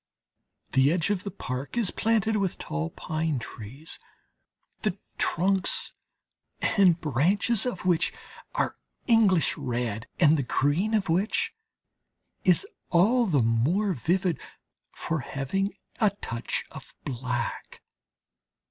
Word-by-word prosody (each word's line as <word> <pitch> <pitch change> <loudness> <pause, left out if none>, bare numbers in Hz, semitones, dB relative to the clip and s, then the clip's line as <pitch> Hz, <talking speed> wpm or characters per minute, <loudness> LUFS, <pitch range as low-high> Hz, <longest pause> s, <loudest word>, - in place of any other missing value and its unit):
The 135 +2 +4
edge 175 +3 +1
of 190 -3 -1
the 200 - -3
park 130 - -5
is 225 -6 +2
planted 220 -1 +1
with 195 -3 -1
tall 75 +1 -3
pine 155 - -2
trees, 125 - -8 0.8
the 210 -3 0 0.2
trunks 190 +2 +1 0.7
and 185 -5 +4
branches 190 - +2
of 190 -7 -4
which 175 -3 +3 0.4
are - - 0 0.3
English 215 -8 +4
red, 120 -3 -3
and 155 -2 +6
the - - +1
green 145 - +1
of 205 -3 +1
which 185 +6 +1 0.9
is 180 -4 +4 0.2
all 225 +8 +4
the 145 -9 +3
more 155 - +2
vivid 175 +4 0 0.5
for 160 -1 -3
having 140 +10 -2 0.3
a 215 - +5
touch 120 - -4
of - - -11
black. 125 -2 -4
170 Hz, 115 wpm, -27 LUFS, 135-200 Hz, 0.9 s, and